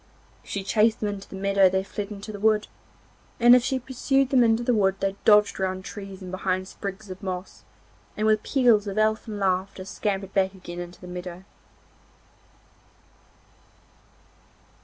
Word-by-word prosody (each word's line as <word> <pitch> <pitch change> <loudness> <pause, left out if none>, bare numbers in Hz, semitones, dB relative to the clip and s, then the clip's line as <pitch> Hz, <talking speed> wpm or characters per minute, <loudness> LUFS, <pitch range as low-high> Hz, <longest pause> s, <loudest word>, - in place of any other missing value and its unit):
If - - -17
she 200 - -3
chased 215 +3 +2
them 210 - -1
in 205 -1 -4
the 195 - -11
meadow 195 0 +3
they 190 +1 0
fled 200 +1 -5
into 205 +1 -8
the 205 - -8
wood, 215 0 +2 0.7
and 240 +1 +8
if 250 - +4
she 265 0 0
pursued 265 +1 0
them 255 -3 +5
into 225 0 +2
the 245 - +2
wood 195 -3 +2
they 195 0 -1
dodged 210 -2 +5
round 185 0 -2
trees 195 -2 -8
and 180 - -7
behind 185 0 -2
sprigs 195 +1 -7
of 185 - -9
moss, 185 -1 -6 0.5
and 215 - 0
with 215 -1 +3
peals 235 -6 +3
of 200 +1 -4
elfin 215 0 0
laughter 190 -1 -1
scampered 195 -1 -3
back 190 -1 +1
again 175 -2 -8
into 175 0 -8
the 180 - -11
meadow. 180 0 -7
200 Hz, 165 wpm, -25 LUFS, 190-220 Hz, 0.7 s, and